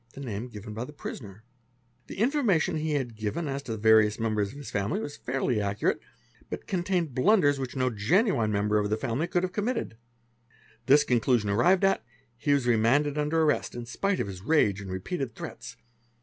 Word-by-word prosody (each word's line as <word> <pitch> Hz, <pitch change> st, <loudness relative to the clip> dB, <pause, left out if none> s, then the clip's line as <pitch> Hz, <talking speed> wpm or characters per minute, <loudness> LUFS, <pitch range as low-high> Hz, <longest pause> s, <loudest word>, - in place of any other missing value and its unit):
the -, -, -10 dB
name 120 Hz, -3 st, -5 dB
given 105 Hz, -3 st, -9 dB
by 110 Hz, +3 st, -4 dB
the 130 Hz, -, -8 dB
prisoner. 110 Hz, -7 st, -8 dB, 0.6 s
'The -, -, -9 dB
information 225 Hz, -, +2 dB
i -, -, -1 dB
e 155 Hz, +1 st, -2 dB
had 130 Hz, -5 st, -2 dB
given 110 Hz, +10 st, -3 dB
as 140 Hz, 0 st, -3 dB
to 115 Hz, -5 st, -5 dB
various 110 Hz, -1 st, +4 dB
members 110 Hz, -3 st, 0 dB
of 140 Hz, -, -12 dB
the 145 Hz, -, -8 dB
family 105 Hz, -, -2 dB
was 145 Hz, -9 st, -5 dB
fairly 125 Hz, -3 st, -1 dB
accurate, 100 Hz, 0 st, 0 dB, 0.5 s
but -, -, -6 dB
contained 180 Hz, -5 st, -1 dB
blunders 145 Hz, -, +3 dB
which 130 Hz, -1 st, -5 dB
no 130 Hz, -1 st, +1 dB
genuine 115 Hz, -, +2 dB
member 105 Hz, +1 st, +1 dB
of 105 Hz, 0 st, -1 dB
the 110 Hz, -, 0 dB
family 120 Hz, +9 st, -2 dB
could 175 Hz, 0 st, 0 dB
ave 185 Hz, 0 st, -2 dB
committed. 220 Hz, -, -2 dB, 0.9 s
This 145 Hz, +2 st, +6 dB
conclusion 120 Hz, -3 st, +2 dB
arrived 175 Hz, -, +3 dB
at, 195 Hz, -13 st, +2 dB, 0.3 s
he 120 Hz, +5 st, -1 dB
was 140 Hz, -3 st, +2 dB
remanded 130 Hz, +6 st, +2 dB
under 155 Hz, +2 st, +2 dB
rrest, 145 Hz, -5 st, 0 dB
in 120 Hz, -1 st, -5 dB
spite 195 Hz, +11 st, -1 dB
of -, -, 0 dB
his 95 Hz, -2 st, -8 dB
rage 105 Hz, -6 st, +2 dB
and 95 Hz, -, -8 dB
repeated 120 Hz, -, -4 dB
threats. 115 Hz, -, -8 dB
125 Hz, 190 wpm, -27 LUFS, 110-160 Hz, 0.9 s, This